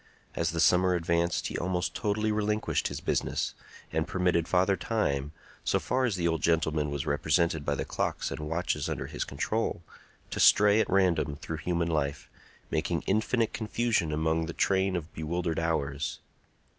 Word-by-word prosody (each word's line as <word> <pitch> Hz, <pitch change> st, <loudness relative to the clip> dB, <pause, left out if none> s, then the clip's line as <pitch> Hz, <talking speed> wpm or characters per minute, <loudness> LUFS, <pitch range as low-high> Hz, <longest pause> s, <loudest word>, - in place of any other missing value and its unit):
As -, -, 0 dB
the 85 Hz, -, -3 dB
summer 90 Hz, +5 st, +4 dB
advanced 85 Hz, 0 st, 0 dB
he -, -, -2 dB
almost 90 Hz, 0 st, -1 dB
totally 110 Hz, 0 st, 0 dB
relinquished 105 Hz, 0 st, 0 dB
his -, -, -5 dB
business, -, -, -1 dB, 0.4 s
and 80 Hz, +1 st, 0 dB
permitted 90 Hz, -2 st, +1 dB
Father 95 Hz, +2 st, +3 dB
Time, 75 Hz, -, -1 dB, 0.3 s
so -, -, +2 dB
far 130 Hz, +1 st, 0 dB
as 115 Hz, -5 st, 0 dB
the 85 Hz, -2 st, 0 dB
old 80 Hz, -1 st, 0 dB
gentleman 80 Hz, -2 st, +1 dB
was 70 Hz, -1 st, -3 dB
represented 80 Hz, +2 st, +1 dB
by 70 Hz, 0 st, 0 dB
the -, -, -3 dB
clocks -, -, -2 dB
and -, -, -4 dB
watches 75 Hz, -1 st, -2 dB
under 65 Hz, -, -3 dB
his 75 Hz, +1 st, -3 dB
control, 110 Hz, -5 st, -2 dB, 0.5 s
to -, -, -3 dB
stray 105 Hz, +1 st, +6 dB
at -, -, +1 dB
random 85 Hz, -6 st, +2 dB
through 80 Hz, +2 st, -6 dB
human 85 Hz, +1 st, -1 dB
life, 75 Hz, -3 st, -2 dB, 0.4 s
making 85 Hz, +1 st, 0 dB
infinite 110 Hz, +3 st, +1 dB
confusion 110 Hz, -6 st, 0 dB
among 80 Hz, +1 st, 0 dB
the 85 Hz, -, -5 dB
train 95 Hz, +1 st, +1 dB
of 85 Hz, -2 st, -5 dB
bewildered 85 Hz, +1 st, -2 dB
hours. 75 Hz, -3 st, -1 dB
85 Hz, 165 wpm, -29 LUFS, 80-95 Hz, 0.5 s, stray